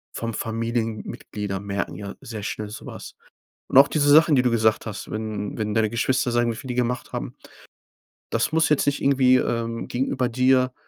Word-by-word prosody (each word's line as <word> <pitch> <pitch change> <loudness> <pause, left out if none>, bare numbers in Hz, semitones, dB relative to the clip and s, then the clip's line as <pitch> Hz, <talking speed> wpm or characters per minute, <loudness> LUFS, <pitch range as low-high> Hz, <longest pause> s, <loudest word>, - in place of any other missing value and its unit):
vor 115 - -4
allem 115 - -3
Familienmitglieder 110 -3 -3
merken 100 0 -4
ja 100 -1 -7
sehr 110 -3 -7
schnell 105 0 -4
so 105 - -9
was. - - -9 0.5
Und - - +5
auch 140 - +8
diese 145 -2 +2
Sachen 155 +1 +6
die 130 - +4
du 125 - +2
gesagt 110 -1 +2
hast, 105 -3 -6
wenn 110 -2 -4
wenn 105 -2 -2
deine 110 -1 +2
Geschwister 120 +1 0
sagen, 120 0 +2
wie - - -8
viel 130 - -9
die 125 - -3
gemacht 125 0 -2
haben - - -5 1.0
das 115 +6 0
muss 160 0 +3
jetzt 150 - +2
nicht 145 - 0
irgendwie, 130 -2 +4
ähm, 115 -2 -2
gegenüber 130 0 -1
dir, 130 +1 +2
115 Hz, 195 wpm, -24 LUFS, 110-130 Hz, 1.0 s, auch